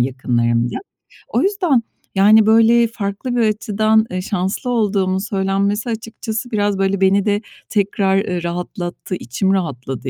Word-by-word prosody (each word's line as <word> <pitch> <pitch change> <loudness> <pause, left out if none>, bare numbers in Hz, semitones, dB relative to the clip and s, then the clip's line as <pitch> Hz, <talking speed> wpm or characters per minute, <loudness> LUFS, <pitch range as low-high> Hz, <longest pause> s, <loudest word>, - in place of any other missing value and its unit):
yakınlarımla. 120 -2 0 0.5
O - - 0
yüzden, 360 - +1 0.3
yani, 210 +3 +6
böyle, 230 +2 +5
farklı 220 +3 -4
bir 240 - +2
açıdan, 215 0 +2
eee, 185 0 -2
şanslı 190 +5 -2
olduğumun 200 -5 +1
söylenmesi 200 +2 -1
açıkçası 225 +1 -5
biraz, 205 -2 0
böyle, 195 0 0
beni 195 +1 +3
de 205 -1 +1 0.3
tekrar, 195 -2 +1
eee, 180 -3 -2
rahatlattı. 175 +1 -4
İçim 180 - -1
rahatladı, 135 -7 -3
200 Hz, 130 wpm, -18 LUFS, 185-220 Hz, 0.5 s, yani